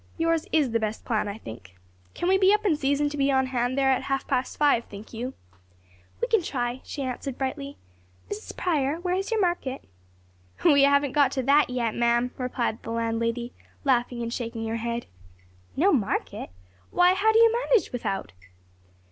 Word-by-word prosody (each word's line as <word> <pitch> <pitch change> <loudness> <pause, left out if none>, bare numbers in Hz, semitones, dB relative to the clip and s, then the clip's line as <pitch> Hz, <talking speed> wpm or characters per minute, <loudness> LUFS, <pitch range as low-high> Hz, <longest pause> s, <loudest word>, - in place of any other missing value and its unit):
"Yours 330 -1 +1
is 295 -6 +2
the 230 - +1
best 220 0 -3
plan, 215 -3 0
I 205 +1 -5
think. 110 - -11 0.4
Can 345 - -2
we 380 +1 +4
be 385 0 +5
up 425 +1 +2
in 355 -6 +3
season 285 0 +1
to 295 - -6
be 275 0 +2
on 265 -1 +3
hand 255 0 -1
there 270 -1 +3
at 260 - +1
half 270 0 -2
past 255 +1 -1
five, 285 -6 +3
think 205 +3 -11
you?" 245 +4 -5 0.8
"We 480 - 0
can 450 -5 +3
try," 245 -5 -3
she 280 - -5
answered 255 0 -4
brightly, 275 +1 -4 0.5
"Mrs. 410 +1 -7
Prior, 310 -3 0
where 360 0 -1
is 385 +1 -1
your 450 -1 0
market?" 345 -8 -1 0.8
"We 285 -4 +6
haven't 280 -1 +3
got 285 -1 +3
to 260 - -1
that 285 +3 +4
yet, 240 -3 -1
ma'am," 240 +1 +1
replied 245 -2 -2
the - - -8
landlady, 230 +1 -2 0.3
laughing 245 -2 +1
and 235 0 -4
shaking 230 -2 -4
her 225 - -1
head. 235 +1 -3 0.7
"No - - +3
market? - - -1 0.4
why 360 +1 +4
how 410 +4 +3
do 440 - +3
you 460 0 +6 0.2
manage 475 -5 +3
without?" 195 - -3
265 Hz, 185 wpm, -26 LUFS, 235-310 Hz, 0.8 s, We